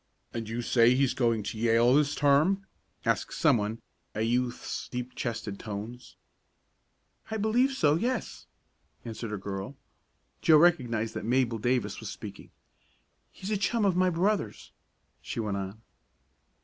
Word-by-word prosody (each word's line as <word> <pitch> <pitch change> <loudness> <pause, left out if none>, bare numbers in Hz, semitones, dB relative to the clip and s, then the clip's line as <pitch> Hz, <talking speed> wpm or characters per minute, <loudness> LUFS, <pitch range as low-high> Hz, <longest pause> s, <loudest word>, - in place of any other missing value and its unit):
"And 115 -2 -4
you 120 +2 -3
say 120 +1 +4
he's 135 -1 +2
going 115 -4 +1
to 110 - -5
Yale 115 +2 +4
this 145 0 +3
term?" 155 +8 +3 0.4
asked - - 0
someone 115 -7 +1 0.3
a 110 - 0
youth's 120 +2 -2
deep 125 0 -5
chested 115 -4 -4
tones. 110 +3 -7 1.1
"I 220 - -2
believe 230 +6 +2
so 155 - +3
yes," 235 +9 -2 0.6
answered 115 -1 -5
a 105 - -2
girl. 95 +6 -5 0.7
Joe 155 - +6
recognized 120 -10 +2
that - - -5
Mabel 120 0 +1
Davis 120 +2 0
was - - -6
speaking. - - -9 0.8
"He's 195 +3 -7
a 210 - +2
chum 215 +2 +1
of 190 -3 +2
my 185 0 +3
brother's," 180 - -1 0.5
she - - -5
went 105 -3 -1
on. 100 +2 -5
125 Hz, 140 wpm, -29 LUFS, 115-165 Hz, 1.1 s, Joe